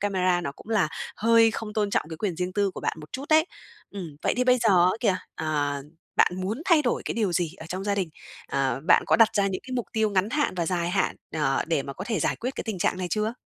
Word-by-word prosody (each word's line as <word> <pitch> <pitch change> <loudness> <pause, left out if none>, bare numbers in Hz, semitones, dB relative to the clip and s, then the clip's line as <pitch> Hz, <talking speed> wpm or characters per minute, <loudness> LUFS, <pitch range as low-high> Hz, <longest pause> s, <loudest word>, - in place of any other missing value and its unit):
camera 185 -3 +1
nó 170 -5 -4
cũng 175 - -16
là 205 -8 +2 0.3
hơi 230 +1 +5
không 220 -1 -5
tôn 210 -1 0
trọng - - +1
cái 160 - -5
quyền 180 0 -2
riêng 180 +1 -2
tư 200 0 +1
của - - -8
bạn - - -2
một 150 - -13
chút 265 - -4
đấy. 315 0 +5 0.5
Ừm, 175 -7 -7
vậy - - +1
thì 250 - +2
bây 250 0 +4
giờ 230 -2 +2 0.2
á 180 - +5
kìa, 205 -6 +2 0.2
ờ, 145 -3 -1 0.4
bạn - - +5
muốn 210 +10 -3
thay 335 -5 +5
đổi 245 - 0
cái - - -3
điều 210 -5 0
gì 170 -1 -1
ở 160 - -10
trong 185 +3 -5
gia 205 - +1
đình? 190 -4 -1 0.4
Ờ, 135 -2 0
bạn - - +6
có - - +4
đặt 225 -1 +7
ra 200 -1 +2
những 190 -1 -2
cái 260 - -7
mục 245 -2 -2
tiêu 220 -1 +1
ngắn 195 +1 +1
hạn 295 -4 0
và 170 -2 -1
dài 175 0 0
hạn, 195 +1 0 0.2
ờ, 135 -3 +1
để 160 -4 +1
mà 140 - -6
có 185 - -7
thể 220 -2 -1
giải - - 0
quyết 250 - -3
cái - - -5
tình 220 -5 -4
trạng 180 - 0
này 180 - -2
chưa? 215 +2 0
195 Hz, 275 wpm, -26 LUFS, 170-225 Hz, 0.5 s, đặt